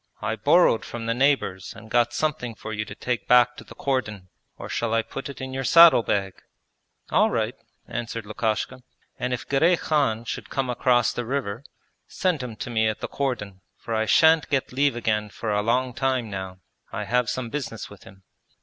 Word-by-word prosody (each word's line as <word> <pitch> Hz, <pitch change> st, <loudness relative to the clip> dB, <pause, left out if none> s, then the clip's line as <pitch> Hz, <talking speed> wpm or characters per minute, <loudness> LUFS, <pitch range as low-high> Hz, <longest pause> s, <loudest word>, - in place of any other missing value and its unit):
I 110 Hz, +1 st, -2 dB
borrowed 115 Hz, -, +4 dB
from 115 Hz, -1 st, -6 dB
the 115 Hz, -, +1 dB
neighbours 125 Hz, -8 st, 0 dB
and 110 Hz, +1 st, -12 dB
got 120 Hz, -1 st, +3 dB
something 135 Hz, -7 st, -2 dB
for 110 Hz, -, -7 dB
you 105 Hz, 0 st, -3 dB
to 105 Hz, -1 st, -9 dB
take 125 Hz, +1 st, -3 dB
back 125 Hz, 0 st, +5 dB
to -, -, -9 dB
the -, -, -14 dB
cordon; 105 Hz, -9 st, -2 dB, 0.3 s
or -, -, -7 dB
shall 115 Hz, -1 st, -1 dB
I 115 Hz, -, +2 dB
put 135 Hz, +5 st, -7 dB
it 140 Hz, -, -9 dB
in 130 Hz, 0 st, -6 dB
your 135 Hz, 0 st, -3 dB
saddle 165 Hz, -1 st, +8 dB
bag?' 95 Hz, -4 st, -1 dB, 0.8 s
'All -, -, +4 dB
right,' -, -, -2 dB, 0.3 s
answered 115 Hz, -2 st, -5 dB
Lukashka. 110 Hz, +3 st, -2 dB, 0.4 s
'And 125 Hz, -, -2 dB
if 125 Hz, -, -3 dB
Girey 165 Hz, +6 st, +3 dB
Khan 135 Hz, -9 st, 0 dB
should -, -, -5 dB
come 135 Hz, -3 st, -1 dB
across 120 Hz, -1 st, +2 dB
the 120 Hz, -, -3 dB
river 120 Hz, -2 st, -3 dB, 0.4 s
send 180 Hz, -7 st, -1 dB
him 125 Hz, -3 st, -6 dB
to 120 Hz, -, -6 dB
me 110 Hz, -1 st, +2 dB
at 110 Hz, -, -2 dB
the -, -, -3 dB
cordon, 100 Hz, -9 st, -3 dB, 0.2 s
for 115 Hz, -, -6 dB
I 110 Hz, 0 st, 0 dB
shan't 160 Hz, +3 st, +5 dB
get 135 Hz, -3 st, -1 dB
leave 140 Hz, 0 st, +2 dB
again 105 Hz, -3 st, -1 dB
for 110 Hz, +2 st, -4 dB
a 105 Hz, -, +2 dB
long 125 Hz, +3 st, 0 dB
time 130 Hz, -3 st, -1 dB
now; 95 Hz, -1 st, -6 dB, 0.3 s
I -, -, -3 dB
have 125 Hz, 0 st, +1 dB
some 120 Hz, -3 st, -3 dB
business 115 Hz, -7 st, -5 dB
with 100 Hz, -, -13 dB
him.' 95 Hz, 0 st, -16 dB
120 Hz, 200 wpm, -24 LUFS, 110-135 Hz, 0.8 s, saddle